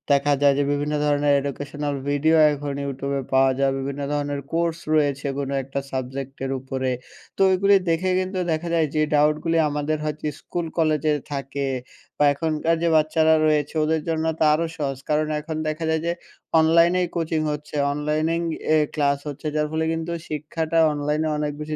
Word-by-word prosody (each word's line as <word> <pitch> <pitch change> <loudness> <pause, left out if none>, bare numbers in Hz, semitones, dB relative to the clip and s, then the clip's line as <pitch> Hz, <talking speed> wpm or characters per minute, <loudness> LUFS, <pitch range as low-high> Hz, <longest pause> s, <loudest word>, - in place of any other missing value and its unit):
দেখা 145 +1 +2
যায় 140 -1 +5
যে, 145 - +2
বিভিন্ন 145 +1 -1
ধরণের 145 0 +2
এডুকেশনাল 145 +1 -4
ভিডিও 155 +3 +3 0.2
এখন 145 -1 -4
ইউটিউবে 140 0 -3
পাওয়া 135 0 +5
যায়, 135 -1 +3
বিভিন্ন 140 +1 -4
ধরণের 145 -1 -2
কোর্স 165 0 0
রয়েছে, 145 -2 +1
কোনো 140 0 -3
একটা 135 +1 -4
সাবজেক্টের 135 +1 -4
উপরে 130 0 -3 0.5
তো - - -3
ওইগুলি 195 +2 +4
দেখে, 165 +3 +1
কিন্তু 185 0 -2
দেখা 160 +2 -1
যায় 160 -2 +2
যে, 155 - +2
ডাউটগুলি 150 +3 +2
আমাদের 150 +1 -1
হয়তো 150 0 -4 0.2
স্কুল 175 -1 -4
কলেজে 155 -2 +2 0.2
থাকে 140 0 -3 0.5
বা - - +2
এখনকার 160 +2 0
যে - - +3
বাচ্চারা 155 +1 +4
রয়েছে, 150 -2 +1
ওদের 160 0 +1
জন্য 160 0 0
তা - - +3
আরও 165 +2 +1
সহজ, 135 -3 -2
কারণ 155 0 +2
এখন 155 +1 -5
দেখা 155 +2 -3
যায় 160 0 +1
যে, - - +2 0.5
অনলাইনেই 170 +3 +4
কোচিং 160 -2 0
হচ্ছে, 150 0 -6 0.2
অনলাইনেই 155 +3 0 0.3
এ - - +5 0.2
ক্লাস 140 -2 +1
হচ্ছে, 145 +1 -5
যার 150 0 +1
ফলে 160 0 0
কিন্তু 165 +1 -3 0.2
শিক্ষাটা 155 +2 -2
অনলাইনে 150 +2 -1
অনেক 150 0 -1
বেশি 155 0 -4
150 Hz, 170 wpm, -23 LUFS, 140-160 Hz, 0.5 s, যায়